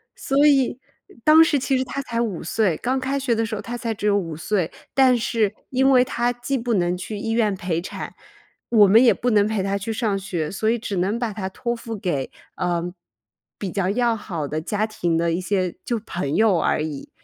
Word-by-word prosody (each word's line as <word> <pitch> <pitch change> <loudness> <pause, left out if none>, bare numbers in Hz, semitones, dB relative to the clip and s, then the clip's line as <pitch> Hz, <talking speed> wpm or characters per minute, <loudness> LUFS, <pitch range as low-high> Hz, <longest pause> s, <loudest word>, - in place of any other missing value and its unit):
所 280 +2 +2
以 270 -3 +3 0.4
当 315 +1 +8
时 300 -3 +2
其 265 +1 0
实 260 - 0
她 275 +2 -4
才 235 -2 -3
5 205 -7 -3
岁， 190 -2 +1
刚 260 +2 -1
开 270 +2 -1
学 255 -3 0
的 225 0 0
时 220 0 -4
候 - - -5
她 240 +1 -5
才 230 -2 -2
只 210 - -6
有 205 0 +3
5 165 -5 -3
岁， 180 +1 -1 0.2
但 260 -2 +5
是 220 -2 0 0.2
因 265 +1 +3
为 250 -2 +6
她 245 -1 0
既 245 +3 -2
不 235 0 -1
能 175 -2 +1
去 205 +3 -6
医 225 +2 -3
院 215 -4 +2
陪 170 -2 -2
产， - - -7 0.6
我 210 -4 +6
们 225 +5 +6
也 245 - +6
不 245 - -1
能 205 -1 +4
陪 215 -3 -1
她 195 +1 0
去 210 +3 -4
上 215 -3 0
学， 175 -6 -3
所 215 +3 0
以 235 - +2
只 205 -4 -4
能 195 +6 0
把 235 -4 -2
她 190 -2 -4
托 235 +4 -3
付 230 -1 -6
给， 145 -9 -2 0.3
呃， 175 -1 -2 0.6
比 195 -3 -4
较 195 -2 0
要 235 +2 +1
好 170 -9 -5
的 155 +2 -3
家 210 +5 -1
庭 175 -6 -1
的 170 0 +1
一 175 - -1
些 185 -2 -1
就 235 - -1
朋 155 -5 -3
友 215 -6 +4
而 155 - +1
已。 150 -3 -6
215 Hz, 235 characters per minute, -22 LUFS, 185-240 Hz, 0.6 s, 当